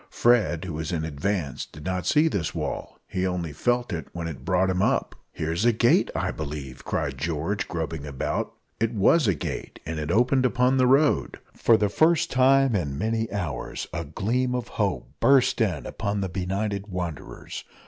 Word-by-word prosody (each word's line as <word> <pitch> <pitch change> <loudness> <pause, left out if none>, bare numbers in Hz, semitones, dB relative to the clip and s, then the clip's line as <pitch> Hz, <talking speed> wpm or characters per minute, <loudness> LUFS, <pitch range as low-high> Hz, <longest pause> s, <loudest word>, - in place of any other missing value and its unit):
Fred, 115 -8 +2
who 90 - -5
was 80 +3 -3
in 80 -3 -1
advance, 80 -2 -2
did 75 +1 -12
not 90 -2 -2
see 150 +2 +4
this 95 - -2
wall - - -4
he 95 0 -1
only 85 -4 -3
felt 120 - 0
it 80 -4 -4
when 85 -1 -4
it 70 -6 -7
brought 95 +3 +2
him 95 0 0
up. - - +1 0.2
"Here's 80 +5 -2
a 120 - +5
gate, 115 +1 +3
I - - 0
believe," 70 -4 -6
cried 70 -3 -2
George, 85 +6 -2
groping 80 -3 -4
about. 70 -2 -2 0.3
It 115 +1 0
was 120 +7 +4
a 100 - +3
gate, - - -5
and 80 0 -3
it 75 0 -3
opened 125 +7 +3
upon 125 +1 +3
the 130 -1 +4
road! 135 - +3 0.2
For 115 - +4
the 105 - +2
first 160 - +3
time 135 0 +4
for 95 -4 +1
many 110 +9 -2
hours 90 -9 -3
a 85 -1 -2
gleam 120 - -1
of 125 -2 -3
hope - - -1
burst 135 -3 +4
in 90 -10 0
upon 100 0 -2
the 95 - -2
benighted 100 +3 -2
wanderers. 90 -6 -6
95 Hz, 185 wpm, -25 LUFS, 80-120 Hz, 0.3 s, a